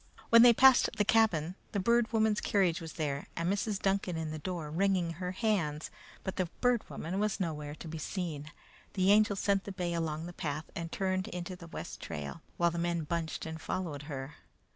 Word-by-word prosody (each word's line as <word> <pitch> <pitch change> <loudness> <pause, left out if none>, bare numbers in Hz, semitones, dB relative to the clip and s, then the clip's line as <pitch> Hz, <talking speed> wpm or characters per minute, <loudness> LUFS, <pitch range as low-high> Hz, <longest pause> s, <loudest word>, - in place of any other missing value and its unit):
When 230 0 +9
they 240 0 +9
passed 260 +2 +6
the 210 - +2
cabin, 180 -8 +3 0.2
the 205 - +1
Bird 235 +3 +3
Woman's 220 -2 +2
carriage 190 -3 +2
was 160 -1 -7
there 145 -4 -2
and 170 +3 0
Mrs. 205 0 -1
Duncan 195 -3 0
in 160 -1 -3
the 155 - -5
door 165 -3 -4
wringing 185 0 +1
her 180 +2 -4
hands, 185 -8 0 0.3
but 190 - -4
the 185 -2 +1
Bird 245 -2 +2
Woman 180 +4 -4
was 210 -1 0
nowhere 150 -5 -3
to 165 - -9
be 160 0 -5
seen. 155 -3 -4 0.4
The 190 0 +3
Angel 210 -1 +5
sent 195 0 +1
the 200 - -5
bay 180 -2 -2
along 160 -1 -2
the 175 - -7
path 155 -2 -4
and 165 -1 -4
turned 185 -1 -1
into 180 +1 -5
the 175 -2 -11
west - - -7
trail, 75 -4 -6 0.2
while 170 0 +3
the 170 - -3
men 170 -1 0
bunched 165 +1 -3
and 160 0 -6
followed 165 -7 -3
her. 135 +1 -6
175 Hz, 205 wpm, -32 LUFS, 160-200 Hz, 0.4 s, When